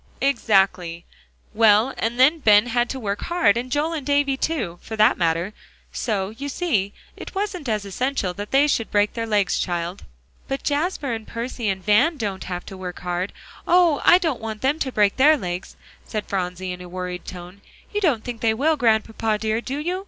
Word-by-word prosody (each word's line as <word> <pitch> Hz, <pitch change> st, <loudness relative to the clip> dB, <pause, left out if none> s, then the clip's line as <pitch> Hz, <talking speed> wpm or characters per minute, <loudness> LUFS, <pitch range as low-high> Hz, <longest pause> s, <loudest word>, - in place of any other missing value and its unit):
"Exactly; 195 Hz, -9 st, +1 dB, 0.5 s
well, 220 Hz, +3 st, +4 dB
and 235 Hz, +2 st, -2 dB
then 295 Hz, +6 st, +5 dB
Ben 210 Hz, -5 st, +5 dB
had 240 Hz, 0 st, 0 dB
to 265 Hz, -, -4 dB
work 205 Hz, -3 st, -3 dB
hard, 340 Hz, -, +3 dB
and 250 Hz, +2 st, -3 dB
Joel 300 Hz, +4 st, 0 dB
and 310 Hz, -4 st, -3 dB
Davie 285 Hz, 0 st, +2 dB
too, 235 Hz, -, -2 dB
for 220 Hz, -, -7 dB
that 215 Hz, 0 st, +5 dB
matter. 170 Hz, +3 st, 0 dB, 0.4 s
So, 200 Hz, -4 st, -2 dB
you 280 Hz, +6 st, -6 dB
see, 235 Hz, -, 0 dB, 0.2 s
it -, -, -10 dB
wasn't 385 Hz, -, -3 dB
as 210 Hz, -2 st, -1 dB
essential 200 Hz, -1 st, -2 dB
that 205 Hz, +2 st, -7 dB
they 275 Hz, +2 st, +4 dB
should 235 Hz, -6 st, 0 dB
break 205 Hz, 0 st, +2 dB
their 230 Hz, -1 st, -3 dB
legs, 205 Hz, -3 st, +1 dB
child." 175 Hz, +1 st, -3 dB, 0.4 s
"But 270 Hz, 0 st, -3 dB
Jasper 290 Hz, -3 st, -1 dB
and 220 Hz, -1 st, -6 dB
Percy 235 Hz, -1 st, -3 dB
and 190 Hz, -1 st, -3 dB
Van 245 Hz, +11 st, +4 dB
don't 200 Hz, -6 st, -4 dB
have 180 Hz, -1 st, -5 dB
to 195 Hz, -, -9 dB
work 180 Hz, -1 st, -7 dB
hard; 180 Hz, +2 st, -2 dB, 0.4 s
oh! 345 Hz, -4 st, +4 dB
I 350 Hz, -, +7 dB
don't 320 Hz, -10 st, -2 dB
want 220 Hz, 0 st, -6 dB
them 285 Hz, +4 st, +1 dB
to 265 Hz, -, -2 dB
break 205 Hz, -4 st, +2 dB
their 300 Hz, +4 st, +6 dB
legs," 180 Hz, -5 st, -5 dB, 0.3 s
said 215 Hz, -2 st, -4 dB
Phronsie, 185 Hz, -1 st, -3 dB
in 180 Hz, 0 st, -7 dB
a 180 Hz, -, -9 dB
worried 180 Hz, 0 st, -5 dB
tone. 180 Hz, +2 st, -10 dB, 0.3 s
"You 415 Hz, -, 0 dB
don't 275 Hz, -, +2 dB
think 240 Hz, -2 st, -6 dB
they 220 Hz, -1 st, +2 dB
will, 305 Hz, +6 st, +2 dB
Grandpapa 220 Hz, -2 st, +1 dB
dear, 220 Hz, +1 st, -1 dB
do 265 Hz, +3 st, -4 dB
you? 350 Hz, +5 st, -2 dB
225 Hz, 195 wpm, -23 LUFS, 195-275 Hz, 0.5 s, I